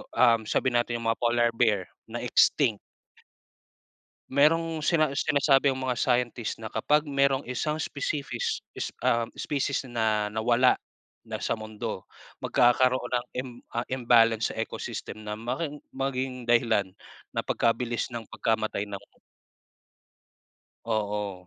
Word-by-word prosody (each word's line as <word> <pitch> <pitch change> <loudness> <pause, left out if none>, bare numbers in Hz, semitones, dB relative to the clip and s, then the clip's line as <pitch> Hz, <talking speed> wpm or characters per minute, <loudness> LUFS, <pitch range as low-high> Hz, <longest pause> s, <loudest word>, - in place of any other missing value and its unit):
um, 115 -3 +5
sabi 130 +2 +1
natin 120 0 +1
yung 115 - -4
mga 115 - +1
polar 120 0 +3
bear, 105 -6 +2 0.2
na - - -3
extinct. - - +3 1.5
Merong 160 +4 +3
sina 155 -4 +3
sinasabi 140 -1 +3
ang 130 - -5
mga 125 -1 -1
scientist 120 -3 0
na 110 - -5
kapag 150 0 +2
merong 140 -2 +1
isang 150 +5 -1
specifies 145 0 -2
is, - - -4
um, 115 0 +2
species 140 -2 -1
na 110 -3 +1
nawala, 120 +3 +3 0.5
na - - -6
sa - - -1
mundo, 110 -2 -5 0.4
magkakaroon 125 +1 +3
ng 120 0 0
im 130 0 -3 0.2
ah, 120 +1 -3
imbalance 115 -3 +3
sa - - -7
ecosystem 110 -1 -5
na 105 0 -5
magi 130 +7 -3 0.2
maging 130 -1 -2
dahilan 115 -5 +3 0.4
ng - - -2
pagkabilis 120 +1 0
ng 115 -2 -6
pagkamatay 110 -2 -1
ng 100 - -4 1.9
Oo. 105 -4 -2
120 Hz, 125 wpm, -27 LUFS, 110-130 Hz, 1.9 s, um